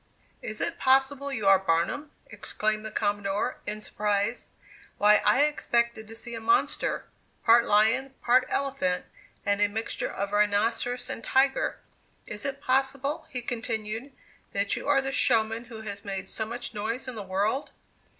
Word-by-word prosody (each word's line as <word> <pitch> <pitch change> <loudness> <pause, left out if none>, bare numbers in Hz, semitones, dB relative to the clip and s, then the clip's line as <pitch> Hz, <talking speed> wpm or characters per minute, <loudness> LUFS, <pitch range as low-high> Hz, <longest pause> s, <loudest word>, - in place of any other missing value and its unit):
"Is - - -4
it - - -1
possible 270 +1 +2
you 220 -6 -3
are 195 -1 +7
Barnum?" 190 - 0 0.2
exclaimed 215 0 -2
the 220 - -4
Commodore, 205 -1 -1
in 210 +1 -3
surprise, 210 +2 -1 0.5
"why, 210 +1 +6
I 280 - +5
expected 235 -6 0
to 225 - -10
see 235 +1 -5
a 230 - -3
monster, 385 - +1 0.4
part 230 +1 +6
lion, 235 +6 +3
part 250 +1 +4
elephant, 275 -10 0 0.4
and 205 0 +1
a 205 - +5
mixture 220 +2 -3
of 200 +1 -3
rhinoceros 220 +4 +1
and 230 - -5
tiger! 270 +2 +2 0.5
Is 210 -1 -4
it 275 0 -3
possible," 275 +3 0
he 250 -2 -5
continued, 225 +1 -3 0.4
"that 200 0 +1
you - - -6
are 275 -2 +4
the 270 - -2
showman 225 -2 +2
who 230 -2 -9
has 200 -2 -6
made 195 -2 -4
so 220 - -4
much 235 +1 -5
noise 230 +5 -3
in 255 - -4
the 220 - -6
world?" 200 +8 -1
225 Hz, 160 wpm, -27 LUFS, 205-260 Hz, 0.5 s, are